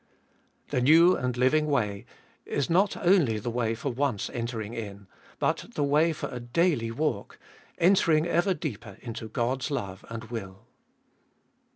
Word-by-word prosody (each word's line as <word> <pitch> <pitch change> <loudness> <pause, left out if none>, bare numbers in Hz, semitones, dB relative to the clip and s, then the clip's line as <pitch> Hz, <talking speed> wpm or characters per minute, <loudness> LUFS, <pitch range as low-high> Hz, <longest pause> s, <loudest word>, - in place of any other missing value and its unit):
2. - - -2
The - - +2
new 165 +7 +6
and 125 -2 -2
living 150 +5 +3
way 105 -9 -1 0.4
is 145 +3 -2
not 195 +4 +3
only 170 - +3
the 110 +3 -3
way 115 -1 0
for 135 +4 -3
once 125 -4 -1
entering 115 -2 -4
in, 100 -3 -7 0.3
but - - 0
the 145 - 0
way 150 +4 +3
for 155 - -4
a 125 - -6
daily 120 0 +1
walk, 115 -3 -2 0.4
entering 170 -3 +4
ever 175 +2 +1
deeper 120 - -6
into 115 -2 -6
Qod's 130 +3 -1
love 100 -10 -4
and 115 0 -6
will. 100 -2 -7
125 Hz, 155 wpm, -27 LUFS, 115-155 Hz, 0.4 s, new